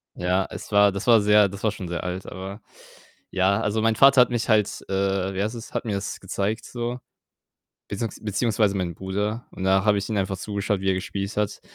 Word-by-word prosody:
Ja, 90 +2 0
es - - -9
war 100 0 +6
das 100 +5 -5
war 115 -2 +7
sehr 105 0 +5
das 100 +1 -9
war 110 - +2
schon 95 -3 -7
sehr 85 0 -4
alt, 90 +1 -4
aber 95 +4 -7 0.7
ja, 95 +3 +2
also, 105 +1 0
mein 115 0 +3
Vater 135 +1 +7
hat 125 - +3
mich 120 -1 -1
halt, 105 -2 +2
äh 95 0 0
wie 95 - -1
heißt 110 - -2
es, 115 - -9
hat - - -2
mir 110 - -2
das 100 0 -4
gezeigt 100 +3 -3
so, 120 +1 -4 0.9
beziehungs 110 +2 -4
beziehungsweise 105 -1 +1
meinen 90 -2 -2
Bruder 105 +5 -3
und 95 - -7
da 95 +1 +3
habe 105 -1 +4
ich 100 - -3
ihm 110 - -1
einfach 95 0 -1
zugeschaut, 100 0 -2
wie 95 - +1
er - - +3
gespielt 100 +2 -4
hat, 105 -1 -1
100 Hz, 220 wpm, -24 LUFS, 95-110 Hz, 0.9 s, war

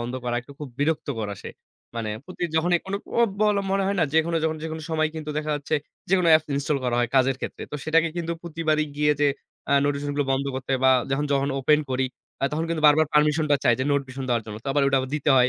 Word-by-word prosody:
বন্ধ 120 +2 -4
করা 120 0 -1 0.2
খুব 150 - -6
বিরক্ত 150 +2 0
করা 105 -2 -3
আসে। - - -8 0.5
মানে 110 -2 -2
প্রতি 185 -1 -9
যখনই 175 +2 +3
কোন 190 - -4 0.2
অ - - +5 0.2
বল 210 -1 +3 0.2
মনে 195 - +2
হয় 200 +1 0
না - - +4
যেকোনো 160 +1 +2
যখন 160 0 0
যেকোনো 160 0 -5
সময় 155 -1 +1
কিন্তু 155 -1 -5
দেখা 155 0 -3
যাচ্ছে 145 +2 -3 0.3
যেকোনো 180 -2 +3
apps 155 - -6
install 140 +1 0
করা 120 -1 0
হয় 120 -1 +1
কাজের 130 0 +3
ক্ষেত্রে। - - -6
তো - - -2
সেটাকে 165 +1 +3
কিন্তু 170 -1 -2
প্রতিবারই 155 -2 0
গিয়ে 150 0 +3
যে 145 - +4 0.4
আ - - +3
notifications 145 0 -1
গুলো 145 - +1
বন্ধ 135 +1 0
করতে 130 0 -3
বা 130 - +7 0.2
যখন 135 +2 0
যখন 140 0 +1
open 150 +3 +4
করি 130 0 +1 0.4
আ - - +4
তখন 160 +2 -1
কিন্তু 165 -2 -2
বারবার 155 +1 +5
permission 150 +1 +3
টা 145 - +6
চায় 120 -2 +5
যে 130 - 0
নোটিফিকেশন 135 -1 -2
দেওয়ার 120 -2 +1
জন্য। 105 -1 -6
তো - - -3
আবার 145 0 +2
ওটা 140 - +3
আবার 130 0 -5
দিতে 150 0 0
হয়। 125 0 +5
150 Hz, 240 wpm, -24 LUFS, 135-160 Hz, 0.5 s, বা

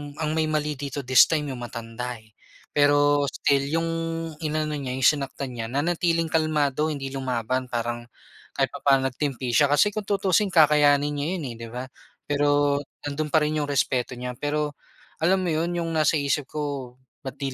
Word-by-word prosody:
ang 155 0 -2
may 160 0 +1
mali 150 -2 -1
dito 140 0 -4
this 130 -1 +6
time 150 -3 -1
yung 130 - -6
matanda 120 +1 -6
eh. 110 -1 -17 0.4
Pero 145 0 +3
still, 140 0 +1
yung 165 0 0 0.5
inano 155 -1 -1
niya 130 -2 -4
yung 130 - -4
sinaktan 140 -2 +1
niya 115 -2 -5
nanatiling 165 +4 0
kalmado 155 -2 +1
hindi 140 -3 -4
lumaban 130 -1 -2
parang 120 0 -3 0.5
kahit - - +1
papaano 135 -1 +2
nag-timpi 130 -2 -3
siya. 140 +5 +4
Kasi 145 +9 +3
kung 210 -1 -5
tutuusin 200 0 +2
kakayanin 150 -4 +4
niya 145 0 -2
yun 170 - -5
eh - - -8
di 115 - -7
ba? 125 +2 -6 0.4
Pero 145 0 +2 0.2
nandun 145 +1 -2
pa 155 0 +3
rin 155 0 0
yung 145 - -1
respeto 130 -2 0
niya. 125 +1 -5
Pero 150 0 -2 0.4
alam 185 +3 +2
mo 175 - 0
yun, 165 +3 -1
yung 170 -1 -2
nasa 155 0 +2
isip 140 -1 0
ko 140 -5 -4 0.3
bakit 135 0 -5
145 Hz, 175 wpm, -25 LUFS, 130-155 Hz, 0.5 s, this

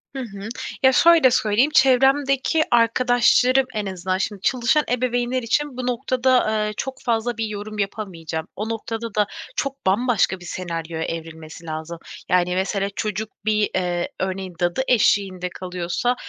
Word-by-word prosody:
Hı - - -3
hı. 200 -2 -7 0.3
Ya, 265 - +7
şöyle 325 -1 +6
söyleyeyim, 235 +5 +2
çevremdeki 270 +3 +3
arkadaşlarım 245 +2 +4
en 210 -1 -2
azından 185 -1 -2
şimdi 200 0 -3
çalışan 255 +7 +2
ebeveynler 245 0 0
için 275 +3 -1
bu 250 -1 -3
noktada, 250 -2 +1
eee, 210 - -4
çok 265 -1 -5
fazla 235 0 -1
bir 225 - -1
yorum 210 0 -6
yapamayacağım. 175 -6 -4
O 215 +3 -4
noktada 225 0 -5
da 210 -1 +2 0.3
çok 275 -1 -4
bambaşka 205 -1 +2
bir 175 - -12
senaryoya 165 -3 -4
evrilmesi 165 0 -7
lazım. 160 +1 -5 0.3
Yani 180 0 +2
mesele 195 +1 -1
çocuk 215 -1 -3 0.2
bir, 215 -1 +2
eee, 175 -2 -1
örneğin 190 -1 -3
dadı 175 +6 0
eşliğinde 195 -6 +2
kalıyorsa, 180 +7 -2
215 Hz, 145 wpm, -22 LUFS, 185-250 Hz, 0.3 s, Ya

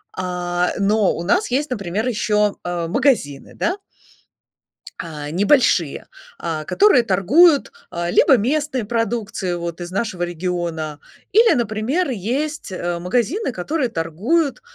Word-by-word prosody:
А, 180 -1 -1
э, - - -6
но 205 0 +2
у 170 - -4
нас 365 - +1
есть, 280 +3 0
например, 205 0 -2
ещё, 210 -3 +1
э, 175 -1 -3
магазины, 225 - 0
да. 360 +4 -1 1.2
А, 150 -3 -6
небольшие. 195 - +2 0.3
А, 160 -2 -4
которые 390 - +4
торгуют, 265 - +4 0.2
а, 170 -1 -3
либо 265 - +5
местной 270 +1 -1
продукцией 225 -5 -2
вот 170 0 -5
из 175 - -5
нашего 190 -3 -2
региона. 170 -3 -3 0.3
Или, 450 +3 +5
например, 240 - -1
есть, 260 - -3
э, 175 -2 -3
магазины, 245 - -1
которые 250 - -2
торгуют, 230 - -1
205 Hz, 125 wpm, -20 LUFS, 175-265 Hz, 1.2 s, либо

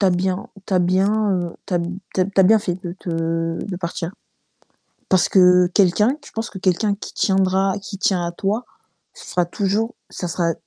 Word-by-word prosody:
tu 200 - +4
as 185 - +4
bien 185 +5 -1 0.2
tu 195 - -1
as 185 - +5
bien, 195 +4 +2
heu, 175 -2 -2
tu 195 - -2
as 175 - +3
b 170 - -2 0.3
tu - - +1
as - - +4
tu 195 +1 +1
as - - +8
bien 220 +4 +6
fait 200 -4 -2
de 175 - -5
te 165 -1 -2
de 195 -3 -5
partir. 170 -1 -4 1.0
Parce 185 -1 +3
que 180 -1 +6
quelqu'un 200 +6 +3
qu 295 -1 -15
je - - -18
pense 225 0 -4
que 190 - -8
quelqu'un 195 +3 +1
qui 200 - -9
tiendra 190 0 +2
qui 195 0 -8
tient 190 -2 +1
à 170 - -3
toi, 205 +7 -2 0.5
ce 485 -1 -13
sera 180 - +1
toujours 205 +6 -1 0.2
ce 180 - -5
sera 170 0 0
190 Hz, 220 wpm, -21 LUFS, 175-200 Hz, 1.0 s, as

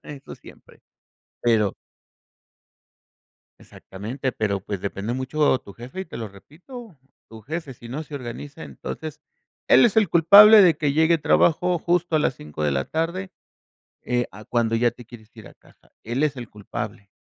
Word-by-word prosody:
eso 140 -2 -10
siempre. - - -17 0.6
Pero 110 -4 +2 1.9
Exactamente, 120 +7 -6
pero 100 -2 -2
pues, 100 0 -5
depende 100 +3 -4
mucho 130 +1 +1
tu 100 - -14
jefe 120 - -9
y - - -4
te 165 - -9
lo 110 -2 -5
repito, 180 - -13 0.3
tu 110 0 -12
jefe, 155 +4 -6
si 120 -1 -13
no 140 +6 -5
se 150 - -11
organiza, 140 +4 -8
entonces 155 -1 -8 0.5
él - - +6
es 220 - -2
el 210 -6 +3
culpable 205 +6 +8
de 175 -5 +5
que 145 -2 0
llegue 160 +3 +3
trabajo 175 +3 +2
justo 175 -1 0
a - - +3
las 135 - 0
5, 75 -3 -8
de 75 - +1
la 70 0 -1
tarde, 170 +4 -3 0.7
eh, 120 -1 -1
a 105 +3 -13
cuando 115 0 0
ya 120 +1 +2
te 120 0 -15
quieres 115 -2 -15
ir 110 -3 -12
a - - -17
casa. - - -26
Él 120 +5 -2
es 150 -3 0
el 120 -3 -8
culpable, 105 0 -7
130 Hz, 170 wpm, -23 LUFS, 110-160 Hz, 1.9 s, culpable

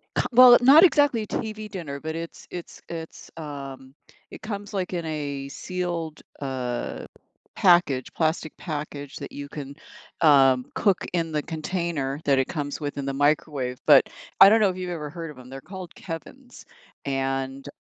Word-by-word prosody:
Come - - +1
well, 245 0 +9
not 280 +6 +8
exactly 285 - +4
TV 215 -1 -4
dinner, 165 -8 -6
but 160 +2 -5
it's 165 0 -8
it's 175 -1 -9
it's, 165 -1 -8
um, 135 -4 -8 0.4
it - - -10
comes, 205 -1 -6
like, 185 -2 -2
in 170 -2 -3
a 145 -3 -4
sealed, 170 -1 -4 0.2
uh, 130 -3 -4 0.5
package 175 -8 +3
plastic 160 -1 -1
package 145 -3 -6
that - - -8
you 145 0 -7
can, 140 -2 -8 0.5
um, 135 -5 +5
cook 200 -5 +1
in 165 -2 -1
the 150 -1 0
container 160 -4 -3
that 140 -2 +3
it 135 - +1
comes 145 -3 -4
with 145 -1 -4
in 140 - -3
the 135 - -2
microwave, 140 -3 0
but 145 -3 +6 0.3
I 195 - +11
don't 220 +2 +5
know 205 - +4
if 185 - -4
you've 185 -1 -4
ever 155 -4 -5
heard 165 0 -7
of 145 - -14
'em, 125 0 -13
they're 135 +1 -8
called 185 0 -9
Kevin's 245 +10 -9 0.4
and 135 0 -2
155 Hz, 170 wpm, -25 LUFS, 140-180 Hz, 0.5 s, I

